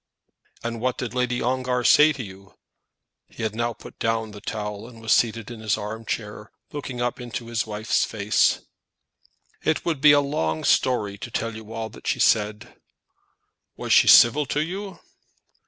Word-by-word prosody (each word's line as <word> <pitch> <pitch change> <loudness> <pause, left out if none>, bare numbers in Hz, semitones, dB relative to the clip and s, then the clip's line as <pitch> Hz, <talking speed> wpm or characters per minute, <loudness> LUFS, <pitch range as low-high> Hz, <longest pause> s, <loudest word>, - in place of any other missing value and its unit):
"And 115 -1 -4
what 130 +1 0
did 120 -3 -4
Lady 125 -1 -1
Ongar 125 0 0
say 150 +5 +6
to 135 -4 -5
you?" 95 -1 -13 0.7
He 115 - -9
had 110 -1 -1
now 120 +1 -1
put - - -14
down 115 -1 -1
the 105 0 -11
towel, 105 0 -5
and 120 -2 -13
was 110 0 -3
seated 115 -1 +1
in 115 - -8
his 110 -2 0
arm 110 +2 -6
chair, 105 -1 -5 0.2
looking 135 -4 -6
up 120 +1 -2
into 120 -1 -6
his 115 -1 -1
wife's 110 +1 0
face. 105 -1 +1 1.0
"It 155 - 0
would 160 -5 -1
be 150 -1 +8
a 145 - +6
long 80 - -1
story 105 -6 +1
to 120 - -7
tell 115 -1 -3
you 110 0 -10
all 115 0 -4
that - - -12
she - - 0
said." 105 +2 +1 1.0
"Was - - 0
she - - +6
civil 135 +5 +7
to 150 +3 0
you?" 190 +2 -6
115 Hz, 175 wpm, -24 LUFS, 110-125 Hz, 1.0 s, be